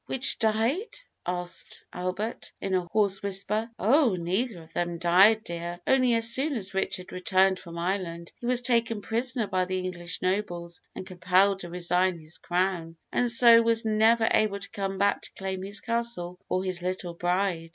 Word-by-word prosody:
"Which 265 0 +1
died?" 230 - 0 0.3
asked 180 0 -4
Albert, 185 +5 -4
in 195 - -3
a 180 -1 0
hoarse 200 -3 +2
whisper. 200 +3 -1
"Oh, 240 - +3
neither 180 +2 -2
of 160 +1 -20
them 175 -1 -2
died, 190 +6 +5
dear; 170 -1 -6
only 255 -3 +3
as 230 0 +3
soon 280 +3 +1
as 200 -3 -4
Richard 190 -1 -3
returned 185 +1 +2
from 170 -1 -10
Ireland 170 -1 -3
he 240 - -5
was 250 0 +2
taken 230 -3 +1
prisoner 235 +2 -1
by 185 -2 0
the 185 +1 -3
English 180 -2 -4
nobles 175 -3 -2
and - - -7
compelled 185 +2 +2
to 175 - -8
resign 180 +1 0
his 155 +1 -10
crown, 175 -2 -1 0.2
and 245 - +1
so 235 0 +8
was 230 0 +1
never 225 +1 +3
able 210 -2 +2
to 200 - -9
come 195 -1 -3
back 200 +1 +1
to - - -8
claim 190 -1 -4
his 200 +2 -1
Castle 230 -7 -2
or 185 - 0
his 185 -2 -2
little 180 -1 -4
bride. 175 -1 -1
190 Hz, 175 wpm, -27 LUFS, 180-225 Hz, 0.3 s, so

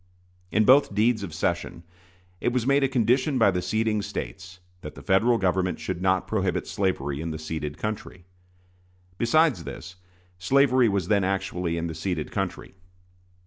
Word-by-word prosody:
In 110 0 +3
both 130 -4 +5
deeds 110 +1 +2
of 100 -4 -6
cession 80 +1 -2 0.6
it 120 - 0
was 125 -2 -1
made 140 +1 +3
a - - +4
condition 130 +2 +1
by 115 -5 +5
the 90 -1 -1
ceding 110 +3 0
States 95 -2 -7 0.2
that - - -9
the - - -11
Federal 110 +5 +3
Government 95 -2 0
should 90 -2 -4
not 95 0 +1
prohibit 95 -4 -1
slavery 75 -7 -2
in 85 - -4
the 80 - -4
ceded 80 -1 -5
country. 105 -4 -5 0.9
Besides 125 - +3
this, 90 +3 -9 0.4
slavery 130 +3 +3
was 100 -3 -1
then 100 -2 +2
actually 90 -3 -2
in 85 - -2
the 80 - -4
ceded 80 -1 -3
country. - - -4
95 Hz, 160 wpm, -25 LUFS, 90-115 Hz, 0.9 s, both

